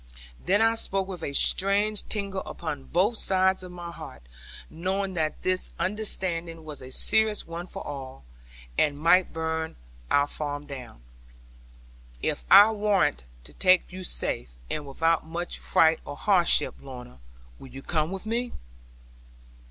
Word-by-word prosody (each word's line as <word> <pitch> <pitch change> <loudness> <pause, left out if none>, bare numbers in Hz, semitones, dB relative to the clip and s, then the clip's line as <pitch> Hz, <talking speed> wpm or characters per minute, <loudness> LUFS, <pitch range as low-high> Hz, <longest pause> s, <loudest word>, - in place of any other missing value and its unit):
Then 200 +4 +3
I 225 0 +4
spoke 195 -4 0
with 185 -3 -7
a 145 - -3
strange 200 +7 +3
tingle 200 -2 -1
upon 150 -5 -5
both 200 +7 +1
sides 190 -1 +3
of 180 -1 -9
my 175 -1 -8
heart, 115 - -11 0.4
knowing 190 +4 -3
that 155 -3 -2
this 185 0 0
undertaking 175 -5 -2
was 150 -3 -9
a 130 - -9
serious 220 +7 +2
one 170 +2 -7
for - - -8
all, 135 - -8 0.5
and 145 -1 +2
might 170 +4 +4
burn 160 - -3 0.3
our 145 0 +4
farm 145 0 -5
down, 125 - -10 1.2
'If - - -2
I 210 +2 +9
warrant 205 - +1 0.2
to - - -11
take 185 -1 +3
you 185 +1 -7
safe, - - -3 0.2
and 145 -2 -3
without 165 +4 0
much 170 +2 -4
fright 160 0 +3
or - - -7
hardship, 185 -4 +3
Lorna, 125 - -11 0.4
will - - -11
you 135 +1 -10
come 155 -2 0
with 195 +2 -6
me?' 235 +2 -2
170 Hz, 145 wpm, -26 LUFS, 145-195 Hz, 1.2 s, I